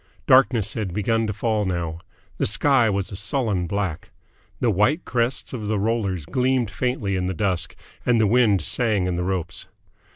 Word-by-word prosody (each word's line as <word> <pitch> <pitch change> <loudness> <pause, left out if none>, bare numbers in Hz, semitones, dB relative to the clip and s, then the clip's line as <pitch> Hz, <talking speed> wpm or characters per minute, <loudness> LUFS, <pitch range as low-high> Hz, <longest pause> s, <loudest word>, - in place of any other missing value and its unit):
Darkness 130 -5 +4
had 100 -6 -4
begun 115 +2 +1
to - - -1
fall 105 +1 0
now. 85 -4 -3 0.4
The - - +2
sky 120 +2 +3
was 100 -1 -2
a - - -6
sullen 100 -3 -1
black. 95 -4 -3 0.5
The 120 - +2
white 105 - +1
crests 120 +2 -1
of 110 -5 -4
the 110 0 0
rollers 100 -6 -1
gleamed 125 - 0
faintly 115 -5 -1
in 90 -1 -1
the 95 - -3
dusk, 90 -3 -1 0.3
and 120 -2 +3
the 110 - +4
wind 105 -5 +3
sang 110 -4 0
in 90 -1 -1
the 90 - -1
ropes. 90 -2 -3
105 Hz, 175 wpm, -23 LUFS, 95-120 Hz, 0.5 s, Darkness